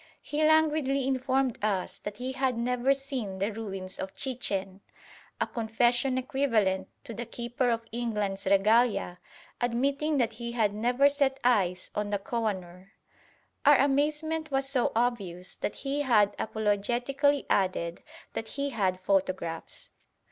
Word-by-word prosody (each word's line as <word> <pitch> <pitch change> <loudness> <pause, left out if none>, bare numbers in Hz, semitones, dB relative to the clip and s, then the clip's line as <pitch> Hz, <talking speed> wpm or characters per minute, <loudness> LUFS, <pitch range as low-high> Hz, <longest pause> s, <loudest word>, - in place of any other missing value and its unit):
He 300 +1 -1
languidly 305 -4 +3
informed 260 -2 0
us 200 -4 -1
that 205 0 -6
he 255 +2 -3
had 260 -2 0
never 250 +2 +1
seen 270 -8 -2
the 200 +3 -1
ruins 195 -4 -5
of 190 0 -5
Chichen: 200 -7 -3 0.6
a - - +2
confession 240 +3 +1
equivalent 230 -8 +1 0.2
to 255 -5 -7
the 235 +2 -5
Keeper 240 +1 -1
of 230 -1 -1
England's 210 -5 -2
Regalia 205 -1 +3 0.4
admitting 275 +5 +1
that 235 -4 +1
he 235 +1 -5
had 215 -4 +1
never 245 +6 +3
set 280 -2 +1
eyes 190 -7 +2
on 210 0 -2
the 205 - +1
Koh 230 +3 -3
i 215 - +2
noor. 185 +1 -12 0.7
Our 290 -1 +7
amazement 300 +3 +1
was 270 -1 +1
so 265 -3 +1
obvious 200 -7 -1
that - - -3
he 280 +1 -2
apologetically 240 +5 +1
added 185 -3 0 0.3
that 225 - -4
he 280 0 -1
had 190 -6 0
photographs. 185 -4 -1
235 Hz, 140 wpm, -29 LUFS, 200-270 Hz, 0.7 s, Our